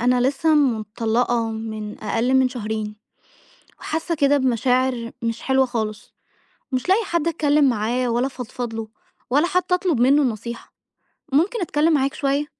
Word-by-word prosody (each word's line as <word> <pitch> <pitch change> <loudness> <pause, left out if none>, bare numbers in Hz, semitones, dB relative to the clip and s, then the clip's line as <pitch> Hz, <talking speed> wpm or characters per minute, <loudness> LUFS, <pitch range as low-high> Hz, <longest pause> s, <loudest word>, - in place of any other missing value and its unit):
أنا 250 +1 +3
لسه 280 +5 +2
مطلّقة 230 -2 +1
من 220 -1 -6
أقل 240 +4 0
من 260 -1 +4
شهرين، 215 -3 -4 0.8
وحاسة 325 +2 -2
كده 290 -2 +3
بمشاعر 250 -1 +1
مش 230 0 -2
حلوة 265 0 +2
خالص، 220 -4 -4 0.6
ومش 255 +6 -2
لاقية 410 +5 +4
حد 340 -3 -1
أتكلم 295 -3 +3
معاه 240 +2 0
ولا 240 +3 +1
أفضفض 245 -2 -6
له، 225 -1 -4 0.4
ولا 290 +7 +3
حتى 365 0 0
أطلب 355 -7 0
منه 270 +4 +5
النصيحة. 235 -2 -4 0.6
ممكن 360 - +2
أتكلم 320 -2 +1
معاك 275 -1 +1
شوية؟ 280 +1 0
255 Hz, 145 wpm, -22 LUFS, 230-290 Hz, 0.8 s, منه